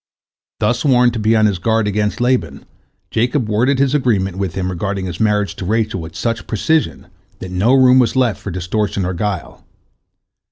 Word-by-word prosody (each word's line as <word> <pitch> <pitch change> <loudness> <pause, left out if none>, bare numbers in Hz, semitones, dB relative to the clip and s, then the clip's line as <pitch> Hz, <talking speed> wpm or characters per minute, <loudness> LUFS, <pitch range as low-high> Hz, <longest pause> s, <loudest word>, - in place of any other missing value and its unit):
Thus - - 0
warned 125 -4 +3
to 115 - -3
be 110 +1 +2
on 110 -1 +4
his 100 -4 0
guard 110 +2 +1
against 105 0 -1
Laban, 120 - -1 0.5
Jacob 120 +2 0
worded 120 +6 +1
his 135 0 +1
agreement 105 -10 0
with 95 -3 -3
him 95 -1 -2
regarding 95 +1 -3
his 90 -1 -6
marriage 105 -2 +1
to 90 - -5
Rachel 110 -2 -1
with 80 0 -9
such 115 -1 -3
precision 155 +9 -1 0.3
that 95 - -8
no 105 +8 +2
room 130 -1 +6
was 125 -1 +2
left 125 -6 +1
for - - -6
distortion 95 +2 -2
or 90 - -2
guile. 95 -1 -4
105 Hz, 185 wpm, -17 LUFS, 95-120 Hz, 0.5 s, room